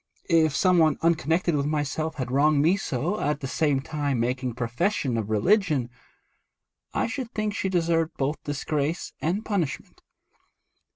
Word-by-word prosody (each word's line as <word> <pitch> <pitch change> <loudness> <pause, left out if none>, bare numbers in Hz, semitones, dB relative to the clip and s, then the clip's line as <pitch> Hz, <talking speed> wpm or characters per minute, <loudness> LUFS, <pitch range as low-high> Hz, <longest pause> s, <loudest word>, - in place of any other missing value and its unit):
If 160 -3 +4
some 180 -2 +4
one 155 -1 +4
unconnected 165 +1 +2
with 140 0 0
myself 155 +1 -2
had 130 -2 -4
wronged 145 +2 +3
me 170 +5 +4
so, 170 - -2
at 150 0 0
the 135 - -3
same 145 -1 +1
time 145 -3 -2
making 125 0 -1
profession 125 - -1
of 110 -2 -2
religion, 145 - +2 1.0
I - - 0
should 250 0 -4
think 215 -1 -1
she 190 - -1
deserved 165 -2 0
both 145 +3 -2
disgrace 145 +2 -2
and 185 +7 -1
punishment.' 180 -10 -3
155 Hz, 150 wpm, -26 LUFS, 135-170 Hz, 1.0 s, If